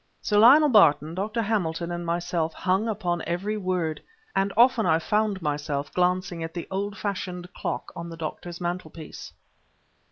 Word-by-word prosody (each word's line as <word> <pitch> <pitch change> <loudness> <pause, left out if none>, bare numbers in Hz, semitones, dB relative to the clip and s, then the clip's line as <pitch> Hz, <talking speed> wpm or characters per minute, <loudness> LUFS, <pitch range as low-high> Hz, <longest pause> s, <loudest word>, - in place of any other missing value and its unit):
Sir 205 -1 +1
Lionel 290 +7 +8
Barton, 160 - +5
Dr. 215 +5 -2
Hamilton, 175 -6 -1
and 175 0 -4
myself 170 -1 -1
hung 190 +4 0
upon 185 -5 -1
every 190 +5 -2
word; 185 -6 -2 0.3
and 195 +1 +1
often 240 -1 +5
I 160 - +3
fond 210 +2 0
myself 145 -1 -2
glancing 180 -1 0
at 165 +1 -6
the 170 - -5
old 200 +2 -3
fashioned 180 -3 -4
clock - - -4
on 170 0 -6
the 165 - -8
doctor's 170 +2 -6
mantel 175 -1 -3
piece. 155 0 -10
180 Hz, 160 wpm, -26 LUFS, 165-205 Hz, 0.3 s, Lionel